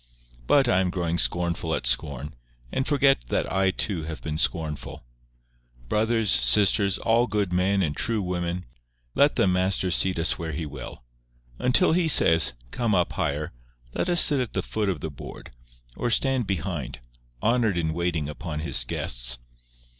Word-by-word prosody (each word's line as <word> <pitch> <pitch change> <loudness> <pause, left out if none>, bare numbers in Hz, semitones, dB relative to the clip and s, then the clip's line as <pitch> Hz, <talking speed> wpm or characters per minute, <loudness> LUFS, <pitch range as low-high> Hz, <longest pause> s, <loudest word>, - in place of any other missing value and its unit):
But 140 -3 +4
I 95 -6 +3
am 95 -1 0
growing 85 -2 -2
scornful 85 -1 -1
at - - -5
scorn, 70 +4 0 0.4
and 130 - -2
forget 140 - +2
that - - -2
I 95 0 +2
too 95 -3 -2
have 80 -1 -6
been 80 -1 -5
scornful. 80 -7 -2 0.9
Brothers, 110 0 +1
sisters, 95 - +4
all 115 +1 +2
good 100 -4 -2
men 95 +2 +1
and 75 -4 -2
true 115 -4 -1
women, 90 0 -3 0.5
let 145 +1 +3
the - - +2
Master 95 0 +1
seat 90 +2 +2
us 80 +1 0
where 80 -2 -5
He 80 +2 -4
will. 70 - -9 0.6
Until 125 +9 +3
he 170 0 +2
says, 80 - +6 0.2
"Come 115 -4 0
up 90 -2 0
higher," 75 +2 -3 0.4
let - - -2
us 175 -1 +5
sit 145 -3 +4
at 125 -3 -3
the - - -2
foot 105 -2 -2
of 90 -5 -3
the 80 - -5
board, 70 - -11 0.4
or 120 - -2
stand 130 0 +1
behind, 90 -9 -4 0.4
honoured 115 -5 +1
in 80 -2 -1
waiting 85 -3 -2
upon 75 +1 -6
His 75 -6 0
guests. - - -3
90 Hz, 165 wpm, -25 LUFS, 80-110 Hz, 0.9 s, says